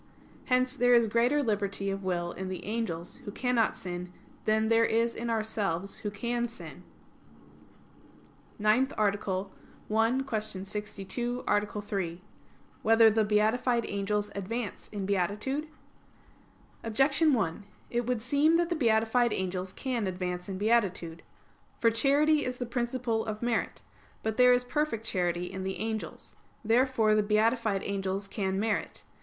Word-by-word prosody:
Hence 255 0 +2
there 245 -1 +5
is 235 -1 +5
greater 240 +7 +2
liberty 200 -3 -1
of 195 0 -4
will 175 -2 -1
in 190 +1 -5
the 185 - -6
angels, 200 -6 -3
who 205 - -8
cannot 240 0 +1
sin, 180 0 -6 0.3
than 220 0 +2
there 230 0 +4
is 230 +1 +2
in 235 +1 -4
ourselves, 205 -5 -2
who 210 - -3
can 235 +4 -2
sin. 170 - -10 1.7
_______________________ - - -30
NINTH 220 +6 +3
ARTICLE 200 -2 0 0.4
[I, 230 +4 +3
Q. 220 -5 0 0.2
62, 210 +4 -4
Art. 205 0 0
3] 180 -4 -3 0.6
Whether 225 0 +6
the 220 +1 +2
Beatified 220 +3 +2
Angels 205 +1 -1
Advance 210 +2 -4
in 205 -2 -4
Beatitude? 210 - -1 1.2
Objection 270 +8 +3
1: 200 -4 -1 0.3
It 240 0 -1
would 245 -3 -1
seem 285 +6 +3
that 340 0 +2
the 345 - 0
beatified 230 -2 +2
angels 185 0 -2
can 240 -2 -2
advance 180 0 -4
in 190 - -4
beatitude. 190 -6 +1 0.6
For 230 - +4
charity 290 +6 +3
is 250 0 -3
the 245 - -3
principle 240 -1 -1
of 215 0 -5
merit. 235 -2 -1 0.4
But 220 0 -2
there 250 0 +7
is 245 0 +4
perfect 250 -4 -1
charity 180 -3 0
in 190 0 -5
the 190 0 -3
angels. 220 0 -5 0.3
Therefore 230 -1 +3
the 215 - +4
beatified 215 -1 +1
angels 195 0 -2
can 195 -1 -2
merit. 215 0 -1
220 Hz, 145 wpm, -29 LUFS, 195-240 Hz, 1.7 s, there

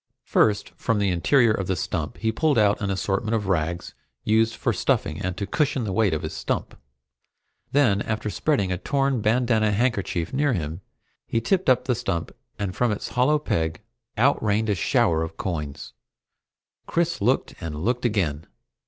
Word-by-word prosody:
First, 105 -1 +2
from 115 -3 0
the 100 -2 +1
interior 115 +7 +3
of 100 -4 -1
the 95 - 0
stump 80 -4 -3
he 110 0 0
pulled 150 +4 +1
out 105 -1 +3
an 100 - -1
assortment 100 +3 -1
of 105 -2 -1
rags 85 -2 -1 0.3
used 110 +1 +2
for - - 0
stuffing, - - 0
and 90 0 -3
to 100 - -2
cushion 140 +2 0
the 100 -3 -2
weight 105 -1 +2
of 75 - -4
his - - -4
stump. - - -3 1.0
Then, 120 -8 +3
after 110 -1 -2
spreading 115 -11 0
a 90 - -2
torn 135 0 0
bandanna 110 -1 +2
handkerchief 100 -7 -1
near 145 0 +2
him, 80 -2 -3 0.5
he 115 - 0
tipped 180 - +1
up 130 - +4
the 130 - +2
stump 115 -8 -3 0.3
and 100 -3 -3
from 125 -2 +1
its 105 - -3
hollow 130 +5 +3
peg, 80 - -2 0.4
out 135 +6 +3
rained 105 +1 +1
a - - +3
shower 80 -2 +2
of 80 0 -5
coins! 75 -6 -4 0.9
Chris 170 -4 0
looked, 125 +6 +1
and 80 -3 -4
looked 125 +1 0
again. 90 -10 0
105 Hz, 175 wpm, -24 LUFS, 95-125 Hz, 1.0 s, up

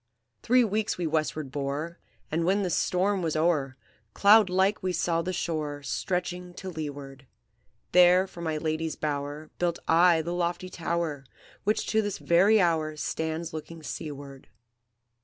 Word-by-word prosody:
"Three 250 +1 +4
weeks 215 -1 -1
we 175 - -2
westward 155 -3 -1
bore, 145 +4 -4 0.3
And 165 +2 0
when 195 +4 +2
the 180 - -1
storm 190 +4 +1
was 160 -3 -1
o'er, 155 -5 +1 0.4
Cloud 205 -1 +6
like 190 +3 +2
we 185 -1 -1
saw 165 0 0
the 180 +2 -3
shore 150 -5 -3
Stretching 180 +4 -3
to 190 0 -7
leeward; 140 -4 -7 0.6
There 180 +1 +6
for 180 -3 -11
my 160 -2 -2
lady's 155 +1 -2
bower 145 +1 -4
Built 175 -1 0
I 165 0 +5
the 170 +2 -3
lofty 175 +1 -2
tower 165 -4 -2 0.4
Which 215 +1 +1
to 220 - +2
this 205 -2 -3
very 195 +6 +4
hour 160 -4 +1
Stands 160 +2 -3
looking 160 +1 -8
seaward. 140 -3 -7
170 Hz, 150 wpm, -27 LUFS, 155-180 Hz, 0.6 s, Cloud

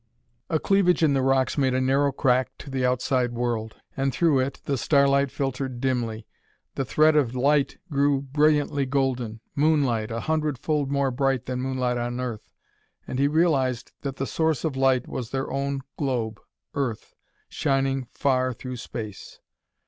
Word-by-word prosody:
A 160 - +2
cleavage 190 -3 +3
in 150 -3 +4
the 135 - +2
rocks 135 +2 +2
made 130 -2 +2
a - - +2
narrow 135 +2 +2
crack 130 -1 +2
to 140 - -10
the 130 -1 -1
outside 125 0 +1
world, 115 -2 -2 0.2
and 135 0 0
through 150 +1 +3
it 135 +1 -2
the 140 - 0
starlight 140 +3 +3
filtered 130 -2 -3
dimly. 120 -4 -1 0.5
The 135 - -2
thread 155 +4 +4
of 130 -5 +2
light 140 +2 +2
grew 140 -1 +2
brilliantly 145 0 +2
golden 125 -5 -1
moonlight, 140 -7 +2
a 115 +1 -3
hundredfold 150 -2 -1
more 140 -1 +1
bright 135 -1 0
than 125 0 -3
moonlight 130 -2 -1
on 120 +1 -3
Earth. 120 -4 -5 0.6
And 130 - -4
he 140 - +4
realized 140 -6 +1
that 135 -2 -4
the 135 - -2
source 160 0 0
of 150 -4 -1
light 130 -2 +2
was 125 -3 -5
their 135 0 -3
own 140 0 -2 0.2
globe, 120 -7 -1 0.3
Earth, 125 -6 -3 0.3
shining 135 -2 0
far 130 -2 +1
through 130 +2 -7
space! 110 -4 -8
135 Hz, 160 wpm, -25 LUFS, 125-140 Hz, 0.6 s, in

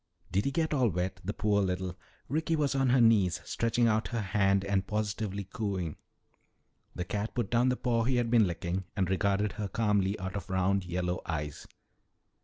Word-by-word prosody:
"Did 95 +3 +1
he 140 - +1
get 160 +2 0
all 130 -5 +3
wet, 90 +1 -3
the 95 - -2
poor 105 -1 +1
little 90 -1 -2 0.2
" - - -34
Ricky 160 +4 0
was 145 -3 +1
on 135 -1 +2
her 125 +1 +4
knees, 110 -7 +4
stretching 115 +1 +1
out 110 0 +1
her 115 -2 -2
hand 100 -1 +2
and 100 -1 0
positively 105 -1 -2
cooing. 95 -5 -3 1.0
The 90 - -3
cat 105 +3 -3
put 120 -5 -1
down 120 +2 +3
the 125 - 0
paw 115 -2 +1
he 130 +1 +2
had 120 -2 +1
been 115 -4 +5
licking 90 +2 -3
and 95 -3 +1
regarded 100 +2 +1
her 105 +2 -4
calmly 100 -2 +1
out 95 0 -5
of 100 -4 -5
round, 95 0 +1
yellow 90 0 -2
eyes. 75 -3 -4
100 Hz, 195 wpm, -30 LUFS, 95-115 Hz, 1.0 s, been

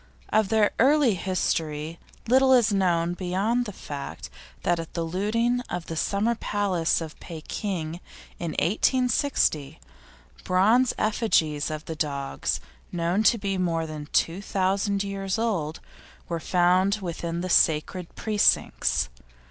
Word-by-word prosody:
Of 215 -2 +2
their 220 -2 +3
early 275 -2 +5
history 165 -4 -2 0.3
little 260 +2 +5
is 235 -4 +4
known, 175 -3 +1
beyond 195 +7 0
the 210 - -5
fact 145 -7 -7 0.3
that 175 -1 +1
at 165 - -7
the 170 - -1
looting 220 +8 0
of 175 - -4
the 165 - -5
Summer 205 +7 +1
Palace 195 -7 0
of 160 -1 -8
Pekin, 165 0 -5 0.4
in 170 -2 -3
1860, 235 - +1 0.6
bronze 220 +8 +4
effigies 165 -10 +1
of 155 0 -5
these 160 - -6
dogs, 140 -2 -2 0.3
known 175 +3 0
to 225 +2 +4
be 195 -2 -2
more 165 -3 0
than 155 -2 -7
two 170 +4 +1
thousand 195 +1 0
years 195 0 -3
old, 180 -9 -1 0.5
were 170 -1 -2
found 180 +3 +3
within 170 -1 -4
the 185 - -3
sacred 165 +2 +2
precincts. 210 -2 +2
185 Hz, 130 wpm, -26 LUFS, 165-215 Hz, 0.6 s, early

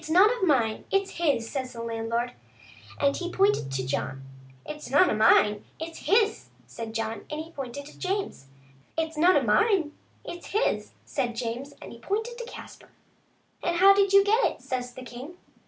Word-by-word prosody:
It's 310 - -9
none 375 +7 +6
of 480 - -8
mine, 250 -11 +2
it's 390 0 +1
his," 285 -9 +1
said 260 +1 -3
the 240 -2 -10
landlord, 230 +1 -2 0.7
and 280 -1 +2
he 355 0 -4
pointed 390 - +2
to 130 -1 -2
John. 135 0 -3 0.2
" 130 0 -25
It's 300 0 -7
none 295 +7 +5
of - - 0
mine, 210 -1 +5 0.2
it's 325 +1 -6
his," 425 +1 +2 0.2
said 225 -1 -8
John, 225 -1 -3
and 300 - -4
he 320 +1 -7
pointed 275 -1 -6
to 295 - -14
James. 385 - -3 0.2
" 135 - -31
It's 320 0 -1
none 345 +3 +5
of 270 - +1
mine, 325 - +3 0.3
it's 345 0 -8
his," 430 +4 0
said 240 -2 -2
James, 245 +4 -4
and - - -9
he 235 - -12
pointed 445 - -3
to 475 - -5
Caspar. 480 - -11 0.4
" - - -37
And 345 - 0
how 385 +3 +7
did 395 -1 +3
you 395 0 +7
get 440 +4 +3
it?" - - 0
says 250 -1 -3
the 255 - -8
king. 255 +8 -9
290 Hz, 200 wpm, -27 LUFS, 230-380 Hz, 0.7 s, how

